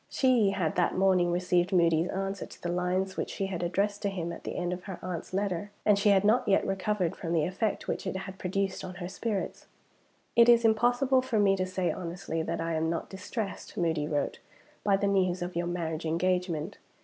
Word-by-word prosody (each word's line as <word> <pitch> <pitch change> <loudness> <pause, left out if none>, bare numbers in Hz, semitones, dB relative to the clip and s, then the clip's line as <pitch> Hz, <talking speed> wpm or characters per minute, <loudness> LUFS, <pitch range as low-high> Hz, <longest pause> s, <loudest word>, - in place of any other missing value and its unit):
She 250 -6 +3
had 185 -5 -1
that 180 - +2
morning 185 -2 +3
received 180 +1 +1
Moody's 170 -2 +3
answer 195 0 -3
to - - -14
the 175 - -1
lines 180 +2 -1
which - - -2
she 195 - -2
had 190 -3 -4
addressed 200 +4 0
to 200 - 0
him 170 -3 -4
at - - -10
the - - -4
end 175 0 -1
of 180 0 -7
her 190 -3 -6
aunt's 180 -3 -5
letter; 195 0 -1 0.2
and 205 -2 +5
she 205 - +4
had 195 -1 +5
not 220 +4 +3
yet 195 - +3
recovered 195 -2 -1
from 165 - -4
the 160 -3 +2
effect 195 +4 -2
which - - -3
it 190 - -2
had 190 0 -7
produced 190 +1 -2
on 185 0 -7
her 175 - -5
spirits. 200 +2 -3 0.7
"It 235 0 +7
is 235 -1 +6
impossible 245 +4 +3
for 255 -3 -1
me 200 -2 +4
to 185 -1 -1
say 185 -1 -1
honestly 170 -2 -4
that - - -3
I 165 0 -1
am 160 0 0
not 165 0 -3
distressed 200 +2 -5
(Moody 160 -4 0
wrote) 145 -2 -1 0.4
by 200 -1 +3
the 200 - -1
news 185 -2 +1
of 180 0 -5
your 175 0 -1
marriage 165 -2 -3
engagement. 180 +1 -1
185 Hz, 215 wpm, -29 LUFS, 175-200 Hz, 0.7 s, It